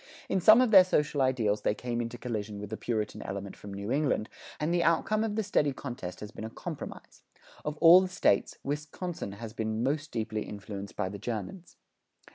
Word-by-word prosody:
In 190 - +1
some 215 +7 +8
of 250 -3 +2
their 190 -3 +10
social 150 -5 +1
ideals 115 -6 +1
they 105 - +1
came 120 0 -3
into 115 +1 -5
collision 110 -4 -4
with 105 0 -7
the - - -2
Puritan 110 -2 -3
element 100 0 -5
from 100 - -10
New 100 +3 -5
England, 140 -6 +1 0.3
and 155 +3 0
the 175 - +3
outcome 190 +6 +2
of 215 -2 -2
the 220 - 0
steady 150 -8 +1
contest 120 -10 -7
has 105 - -7
been - - -8
a 110 - -4
compromise. - - -8 0.4
Of 150 0 -3
all 170 +3 +9
the 190 - -1
States, 180 - +1
Wisconsin 150 - -4
has 110 +2 -8
been 110 0 -2
most 145 +3 -1
deeply 110 -2 -2
influenced 100 -1 -7
by 95 - -1
the 100 +1 -7
Germans. 120 - -6
120 Hz, 200 wpm, -29 LUFS, 105-160 Hz, 0.4 s, their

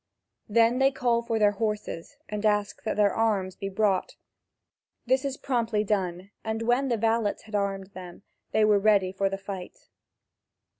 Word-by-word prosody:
Then 230 +3 +4
they 270 0 +5
call 245 -3 +1
for 230 -1 -2
their 210 -1 +4
horses, 210 -5 -4
and 210 0 -4
ask 205 -1 +1
that 220 - -3
their 205 -1 +4
arms 200 -5 0
be 195 - -5
brought. 195 -1 0 0.9
This 260 +2 +2
is 275 -1 -3
promptly 235 -5 0
done, 190 -2 -2
and 220 0 -2
when 245 +4 +2
the 235 -3 +1
valets 225 -1 0
had 220 - -15
armed 200 -1 -2
them, 180 0 -10 0.3
they 220 - +3
were 210 -1 +4
ready 200 -3 +3
for 195 +1 0
the 195 - -3
fight. 195 -2 -9
210 Hz, 165 wpm, -27 LUFS, 195-230 Hz, 0.9 s, they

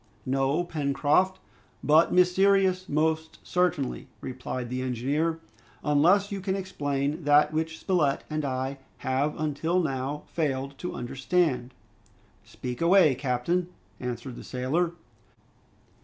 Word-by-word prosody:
"No, 135 +5 +1
Pencroft, 155 +4 +1 0.4
but 155 +3 +5
mysterious, 185 +1 +3
most 160 +1 0
certainly," 180 -9 0
replied 130 -1 -5
the 130 0 -2
engineer; 140 +7 -1 0.4
"unless 175 +8 +4
you 200 -1 -3
can 190 0 -1
explain 145 -5 -2
that 150 +1 +5
which 160 0 -2
Spilett 155 -8 +1
and 155 0 -2
I 135 0 -2 0.3
have 135 +3 0
until 155 +4 0
now 140 -2 -2
failed 140 -4 -2
to 180 - -4
understand." 130 0 0 0.7
"Speak 125 +2 -7
away, 170 -3 +6
captain," 135 +8 0 0.3
answered 125 0 -5
the - - -8
sailor. 150 +7 -1
150 Hz, 110 wpm, -27 LUFS, 135-175 Hz, 0.7 s, away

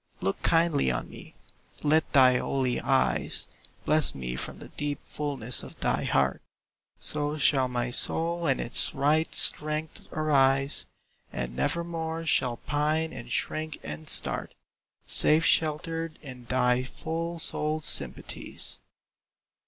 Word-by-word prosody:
Look 95 - -2
kindly 165 - +2
on 60 - -3
me, - - -13 0.5
let 155 +2 +2
thy 130 -3 +6
holy 130 -2 -1
eyes 135 -1 0 0.4
Bless 155 0 +4
me 60 -2 -5
from - - -6
the - - -12
deep 145 -1 -4
fulness 135 -5 -3
of - - -12
thy - - 0
heart; 70 -1 +1 0.6
So 150 0 -1
shall 135 -3 +3
my 120 -1 -2
soul 170 +6 +1
in 135 - +1
its 115 - 0
right 155 +3 +1
strength 155 +1 -1
arise, 135 -3 +2 0.4
And - - -5
nevermore 165 - -3
shall 125 -6 +1
pine 155 +3 -1
and 120 +1 -9
shrink 155 +3 -2
and 75 +1 -6
start, - - +1 0.5
Safe 160 +2 +6
sheltered 165 +1 0
in 125 -3 -10
thy 125 0 +1
full 165 +6 -5
souled 155 -1 +1
sympathies. - - +1
145 Hz, 125 wpm, -27 LUFS, 125-160 Hz, 0.6 s, thy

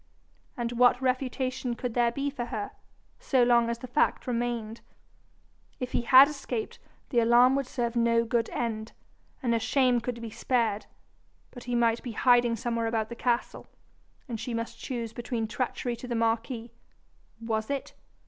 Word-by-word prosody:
And 240 -1 -2
what 245 +1 +4
refutation 255 -1 -1
could 245 -1 -4
there 240 0 +2
be 280 +3 -2
for 245 -4 -4
her, 215 -4 -4 0.5
so 260 -3 +2
long 240 -1 +4
as 235 - -2
the 255 - -8
fact 250 +5 +1
remained? 235 -2 -2 1.0
If 250 -1 -4
he - - +1
had 260 +3 +8
escaped, 275 -6 -5 0.3
the 240 - +2
alarm 240 +3 +5
would 275 -2 -1
serve 240 -2 -2
no 230 0 +3
good 230 -1 0
end, 220 -2 -3 0.5
and 235 -2 +2
her 230 - +2
shame 245 +1 +2
could 235 0 -4
be 230 -1 -7
spared; 225 -4 0 0.6
but 245 - -11
he 245 -1 -2
might 230 -1 +2
be 240 - -6
hiding 240 0 +4
somewhere 230 0 -2
about 220 -1 -1
the 235 - -6
castle, 240 0 -1 0.6
and 230 -3 -5
she 240 +1 -4
must 230 0 -5
choose 235 -4 -4
between 235 -1 -3
treachery 240 +1 -2
to 250 - -8
the 240 - -2
marquis 230 +1 -1 0.7
was 220 -1 -2
it? 280 -1 -3
240 Hz, 165 wpm, -28 LUFS, 230-250 Hz, 1.0 s, had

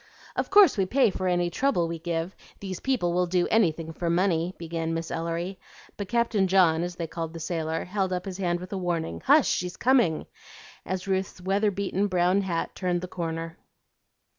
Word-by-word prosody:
"Of - - -1
course 395 - +6
we 190 - +2
pay 250 -1 +3
for 185 0 -3
any 175 -1 +1
trouble 180 -5 +1
we 165 0 -5
give; 170 +2 -3 0.2
these 190 -2 -5
people 240 -11 0
will 180 0 +1
do 175 0 +1
anything 165 -7 +2
for 170 +1 -2
money," 175 0 +1
began 165 -1 -3
Miss 165 0 -4
Ellery; 170 +3 -3 0.4
but 200 -2 -6
Captain 235 -5 +2
John, 175 -4 +4
as 175 0 -3
they 170 - -3
called 165 0 -5
the 165 - -7
sailor, 160 -1 -2
held 190 0 -1
up 180 -1 -2
his 190 -1 -6
hand 175 -2 0
with 180 +2 -8
a 195 - -2
warning, 165 - -2
"Hush! - - +6
she's 180 0 -1
coming," 240 -11 +3 0.6
as 185 +1 -3
Ruth's 190 -1 -1
weather 195 +3 +1
beaten 200 0 -1
brown 180 +1 +2
hat 175 -4 -2
turned 180 -2 -1
the 185 - -5
corner. 165 -2 -5
180 Hz, 190 wpm, -26 LUFS, 165-195 Hz, 0.6 s, course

